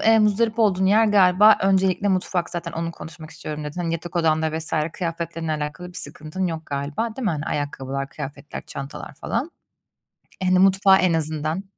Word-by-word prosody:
eee, 225 0 +5
muzdarip 220 +2 +2
olduğun 190 -4 +3
yer 215 +3 +5
galiba 205 +1 +6
öncelikle 190 0 +2
mutfak 185 -2 0
zaten 170 -1 -4
"Onu 165 0 -3
konuşmak 160 0 -10
istiyorum." 150 -1 -6
dedin. 150 +4 -5
Hani, 165 -1 -1
yatak 170 +2 -5
odanda 160 -1 +1
vs. 160 - -4 0.2
kıyafetlerinle 165 -2 -3
alakalı 150 +4 -4
bir 180 - -12
sıkıntın 155 +5 -3
yok 160 -2 -5
galiba, 145 +11 -3
değil 265 - -4
mi? 205 - +2
Hani, 150 -2 -3
ayakkabılar, 135 -1 -3
kıyafetler, 140 +1 -7
çantalar 140 +2 -7
falan. 250 - -3 0.9
Hani, 185 0 +3
mutfağı 195 0 +5
en 185 -2 +2
azından. 155 +2 -1
170 Hz, 170 wpm, -23 LUFS, 155-190 Hz, 0.9 s, galiba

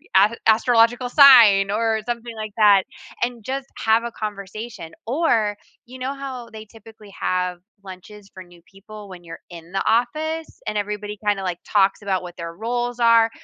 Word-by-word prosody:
as 205 +4 +5
astrological 235 +2 +3
sign." 230 -9 +7
Or 220 0 0
something 235 -1 -5
like 215 -1 -6
that 205 -3 +5 0.4
and 240 -3 -3
just 270 +2 -5
have 225 +1 +2
a 235 - -5
conversation. 210 -3 -7 0.2
Or, 230 -7 +1 0.3
you 255 +2 -12
know 265 +2 -3
how 260 -4 -8
they 220 0 -10
typically 220 -2 -16
have 180 -1 -2 0.2
lunches 195 +2 -12
for 185 - -10
new 175 -1 -19
people 205 +1 -13
when 180 -2 -12
you're 165 0 -10
in 170 0 -12
the 195 - -2
office 310 +8 -1
and 210 - -3
everybody 210 0 -4
kinda, 200 -2 0
like, 180 -2 -4
talks 195 0 +2
about 195 -2 -1
what 175 0 -10
their 170 0 -7
roles 240 +3 -3
are? 230 -1 +5
215 Hz, 170 wpm, -21 LUFS, 195-240 Hz, 0.4 s, sign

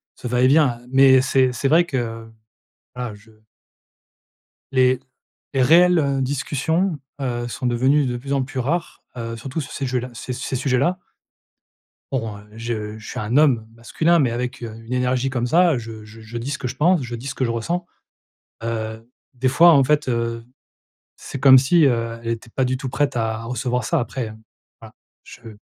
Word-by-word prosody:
ce - - -7
va-et-vient 125 +1 +3
mais 130 0 +6
c'est 130 -1 +2
c'est 125 +3 -1
vrai 165 +5 +4
que 115 -7 -4 0.7
voilà 125 -3 -5
je 110 +2 -20 1.4
Les 130 -1 +3 0.5
les 135 - +2
réelles, 175 +5 +6
heu, 140 -2 0
discussions, 150 +6 -1 0.2
heu, 120 -2 -2
sont 125 - -5
devenues 130 +4 +2
de 125 -1 -2
plus 135 +3 -7
en 140 - +1
plus 130 0 -5
rares, 165 +7 -2
heu, 115 -1 -4
surtout 130 +7 -5
sur 140 - -9
ces 140 - -3
jeux 125 0 -1
là 125 +1 -6
ces 125 +2 -6
ces 130 +1 -4
sujets-là. 140 +7 0 1.1
Bon, 115 -6 -3
heu, 105 - -14
je 110 -2 -4
je 110 - -12
suis - - -5
un 110 +6 0
homme 130 -8 +4
masculin 160 +9 +1
mais 130 -6 +2
avec, 125 +2 -4
heu, 110 -2 -6
une 115 - -11
énergie 125 +1 0
comme 125 -2 -1
ça, 170 +1 +4
je 110 -2 -8
je 110 +2 -10
dis 125 +5 -4
ce 140 - -2
que 125 - -4
je 125 - -6
pense 170 +4 +3
je 120 -2 -5
dis 120 +4 -8
ce 135 - -5
que 130 - 0
je - - -2
ressens, 170 +10 -2 0.8
heu, 110 -1 -4 0.3
des 130 +1 0
fois, 165 +6 +7
en 140 -3 +5
fait, 150 +2 +1
heu, 115 -1 -2 0.7
c'est 135 - -8
comme 130 -1 +8
si, 150 +4 +4
heu, 115 -2 -1
elle 115 - -6
était 115 0 -4
pas 130 - 0
du 130 +1 0
tout 130 +1 -5
prête 140 0 -1
à 110 -1 -1
recevoir 125 +1 -2
ça 170 - 0
après, 125 -1 -3
heu, 110 - -10 0.5
voilà, - - -13 0.3
je 110 -3 -12
125 Hz, 190 wpm, -21 LUFS, 115-140 Hz, 1.4 s, comme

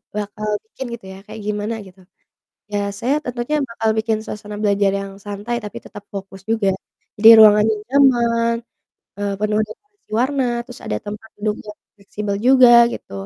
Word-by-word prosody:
bakal 210 +1 -4 0.2
bikin 265 - -8
gitu 225 -5 -9
ya, - - -11
kayak 220 - -9
gimana 210 +2 -2
gitu, 190 +1 -18 0.7
iya 205 0 -2 0.2
saya 250 +5 0
tentunya 245 +4 -2
bakal 225 -1 -1
bikin 220 0 0
suasana 210 -1 -7
belajar 200 -1 +2
yang 195 0 -6
santai, 205 +3 -4
tapi 210 - -8
tetap 205 - -11
fokus 195 -1 -8
juga. 220 -3 +1 0.5
Jadi 220 +2 +7
ruangannya 215 0 +7
nyaman, 235 -4 +3 0.6
eee, 205 0 -2
penuh 210 0 +1
dekorasi 410 - -17
warna, 265 +1 +1 0.2
terus 245 0 -12
ada 105 - -1
tempat 210 +2 -7
duduk 210 0 -1
yang 210 0 -10 0.2
fleksibel 200 0 -4
juga 255 -1 +7 0.2
gitu - - -9
215 Hz, 160 wpm, -20 LUFS, 205-240 Hz, 0.7 s, Jadi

